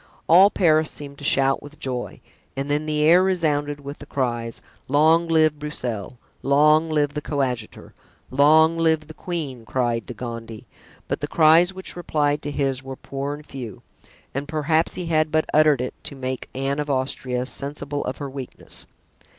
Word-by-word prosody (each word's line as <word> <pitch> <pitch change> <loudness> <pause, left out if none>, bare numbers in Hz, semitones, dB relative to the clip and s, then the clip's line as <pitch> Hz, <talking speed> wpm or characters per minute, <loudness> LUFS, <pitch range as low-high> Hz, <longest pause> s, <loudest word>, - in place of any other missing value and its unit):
All 185 +5 +8
Paris 155 -6 +3
seemed 140 -1 -8
to - - -11
shout 135 -1 +2
with 145 +1 -12
joy, 125 -2 -4 0.4
and 140 +1 -2
then 150 +1 0
the 150 0 +1
air 170 +4 +6
resounded 150 -6 0
with 140 +1 -8
the 145 - -11
cries 120 -4 -2
of - - -14 0.2
"Long 160 +4 +4
live 155 -2 +3
Broussel!" 125 -7 -5 0.2
"Long 150 +3 +4
live 145 -2 +1
the 150 - -3
coadjutor!" 130 -7 -3 0.4
"Long 160 +4 +5
live 160 -1 +3
the 155 - -11
queen!" 150 -9 -5
cried 120 -1 -1
De 125 - -7
Gondy; 115 -2 -7 0.4
but - - -2
the - - -2
cries 165 +3 +5
which 190 0 -6
replied 150 -4 0
to 145 - -4
his 135 -2 -1
were 135 0 -7
poor 140 +2 -5
and 150 0 -13
few, 120 -9 -8 0.5
and 140 +2 -3
perhaps 155 +1 0
he 180 - -4
had 155 -1 +2
but 155 0 +1
uttered 150 -3 +5
it 125 - -3
to 140 - -6
make 130 -1 -5
Anne 135 +2 -1
of 150 0 -3
Austria 130 -2 -1
sensible 145 +1 -3
of 130 - -4
her 145 - -5
weakness. 135 -2 -5
145 Hz, 175 wpm, -23 LUFS, 135-155 Hz, 0.5 s, All